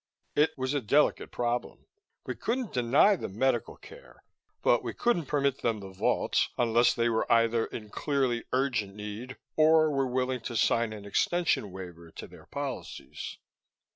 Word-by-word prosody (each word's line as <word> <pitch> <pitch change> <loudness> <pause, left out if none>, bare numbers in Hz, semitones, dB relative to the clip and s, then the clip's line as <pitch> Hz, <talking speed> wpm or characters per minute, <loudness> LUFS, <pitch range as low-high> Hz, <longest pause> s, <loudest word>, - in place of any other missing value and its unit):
It 150 +1 +2
was 130 +1 -1
a 145 - 0
delicate 140 +7 +2
problem; 120 0 -3 0.4
we - - -3
couldn't 245 -1 -3
deny 130 - +4
them 100 - -7
medical 120 -2 0
care, - - -15 0.4
but - - +4
we - - -5
couldn't 175 - +1
permit 140 -2 0
them 115 -2 0
the 95 -1 -9
vaults 95 - +1
unless 120 0 +3
they 120 0 +1
were 115 -1 0
either 115 0 +3
in 105 -2 -8
clearly 135 -5 0
urgent 125 -7 0
need, 105 +5 -7 0.2
or 155 0 +5
were 135 -2 +1
willing 130 0 -1
to 120 +1 -5
sign 115 0 +2
an 105 -2 -8
extension 160 - +1
waiver 90 -3 -9
to - - -8
their - - -15
policies.... - - -6
125 Hz, 160 wpm, -29 LUFS, 110-140 Hz, 0.4 s, or